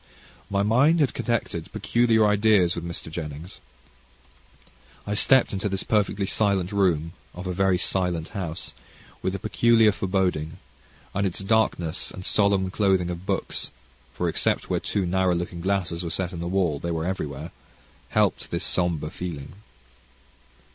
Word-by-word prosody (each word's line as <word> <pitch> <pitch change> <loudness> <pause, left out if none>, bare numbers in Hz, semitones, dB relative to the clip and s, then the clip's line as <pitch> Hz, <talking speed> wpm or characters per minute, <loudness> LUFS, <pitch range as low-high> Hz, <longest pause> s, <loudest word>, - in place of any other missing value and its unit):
My 100 0 +1
mind 135 +10 +4
had 145 -4 +2
connected 110 -8 -2
peculiar 115 -2 +3
ideas 105 -4 +4
with 85 - -5
Mr. 85 -1 -6
Jennings. 80 +1 -7 1.4
I 105 - -2
stepped 130 +4 +4
into 100 +1 -1
this 95 0 -2
perfectly 105 -2 +1
silent 100 -2 +1
room, 85 -5 +1 0.2
of 90 +1 -7
a 90 - -2
very 95 0 +2
silent 90 -3 0
house, 90 -5 -5 0.5
with 95 - -1
a - - -1
peculiar 115 +1 +4
foreboding; 90 -5 -1 0.6
and 100 0 +1
its 90 - -4
darkness, 95 -5 0
and 95 - -9
solemn 100 -2 +2
clothing 95 -3 +2
of 85 +2 -7
books, - - -1 0.4
for - - -2
except - - 0
where - - +2
two 100 -3 -1
narrow 90 0 +2
looking 85 0 -4
glasses 90 -3 -1
were 85 - -3
set 90 +2 -2
in 85 - -5
the 85 - -3
wall, 90 -6 +1
they 85 - -4
were 80 -1 -2
everywhere, 75 -4 -4 0.6
helped - - +1
this - - -1
somber 85 -4 0
feeling. 85 -7 -6
95 Hz, 150 wpm, -25 LUFS, 85-100 Hz, 1.4 s, mind